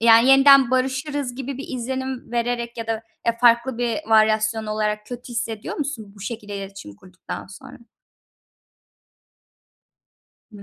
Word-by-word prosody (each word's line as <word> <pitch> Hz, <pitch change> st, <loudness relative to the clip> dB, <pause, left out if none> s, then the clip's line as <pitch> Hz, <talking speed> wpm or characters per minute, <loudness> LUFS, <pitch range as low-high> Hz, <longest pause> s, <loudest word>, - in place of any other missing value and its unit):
yani, 230 Hz, +2 st, +6 dB
yeniden 270 Hz, -1 st, +7 dB
barışırız 260 Hz, 0 st, -1 dB
gibi 270 Hz, 0 st, -5 dB
bir 275 Hz, -, -7 dB
izlenim 260 Hz, 0 st, -4 dB
vererek 235 Hz, 0 st, -2 dB
ya 230 Hz, -, -5 dB
da, 225 Hz, 0 st, -2 dB, 0.2 s
eee, 230 Hz, -, +2 dB
farklı 235 Hz, +1 st, +4 dB
bir 240 Hz, +2 st, 0 dB
varyasyon 220 Hz, 0 st, +3 dB
olarak 210 Hz, 0 st, -2 dB
kötü 245 Hz, 0 st, -8 dB
hissediyor 225 Hz, -2 st, -4 dB
musun 245 Hz, -9 st, -5 dB
bu -, -, -14 dB
şekilde 210 Hz, -2 st, -6 dB
iletişim 195 Hz, -, -9 dB
kurduktan 185 Hz, -, -9 dB
sonra? 195 Hz, -, -12 dB, 2.7 s
Hı. 200 Hz, -1 st, -11 dB
235 Hz, 130 wpm, -22 LUFS, 215-260 Hz, 2.7 s, yeniden